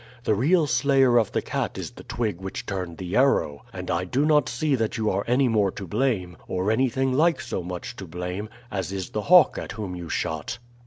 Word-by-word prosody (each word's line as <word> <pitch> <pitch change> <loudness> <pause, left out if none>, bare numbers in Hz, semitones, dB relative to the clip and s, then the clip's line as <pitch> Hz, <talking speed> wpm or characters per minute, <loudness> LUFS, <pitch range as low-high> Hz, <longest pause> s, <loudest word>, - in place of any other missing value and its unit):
The 110 - +2
real 155 - +3
slayer 130 -1 +4
of 110 - 0
the - - -1
cat - - -3
is - - -5
the - - -12
twig 105 -7 -3
which 95 0 -5
turned 90 -4 -4
the 90 +1 -4
arrow, 75 - +2
and - - -5
I 85 +1 0
do 130 +10 0
not 150 -4 +3
see 145 +5 0
that 115 -2 0
you 110 -1 +1
are 100 +2 0
any 125 +3 +3
more 105 -4 +2
to 100 - -6
blame, 100 -4 -1
or 95 +3 0
anything 130 +2 +1
like 165 +5 +3
so - - -3
much 90 +6 -6
to 95 - -7
blame, 90 +5 -5 0.2
as 95 -2 -3
is 95 -2 -4
the 105 - -2
hawk 180 -2 +7
at - - -6
whom 100 -5 -5
you 85 -2 -7
shot." 80 -3 -2
105 Hz, 220 wpm, -25 LUFS, 90-130 Hz, 0.2 s, hawk